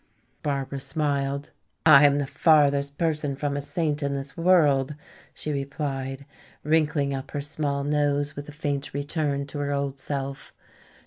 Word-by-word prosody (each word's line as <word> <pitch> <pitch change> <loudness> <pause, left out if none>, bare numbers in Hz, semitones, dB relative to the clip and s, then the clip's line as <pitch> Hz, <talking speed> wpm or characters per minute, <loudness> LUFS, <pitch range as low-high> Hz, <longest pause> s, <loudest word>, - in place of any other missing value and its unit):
Barbara 140 -1 -2
smiled. 140 0 -1 0.3
"I 150 -2 +9
am 140 0 +2
the 145 - 0
farthest 140 -1 +3
person 150 -4 0
from 140 +1 -2
a 145 - -1
saint 150 0 -1
in 140 -1 -1
this 140 0 -5
world," 150 -6 +3 0.4
she 155 - -4
replied, 140 -1 -3 0.4
wrinkling 150 -2 +2
up 135 0 -5
her 145 - -3
small 145 -1 -2
nose 145 0 0
with 145 +1 -7
a - - -6
faint 145 -2 -3
return 145 -1 -1
to 145 +1 -6
her 145 0 -1
old 140 -1 -2
self. 135 0 -4
145 Hz, 150 wpm, -26 LUFS, 140-150 Hz, 0.4 s, I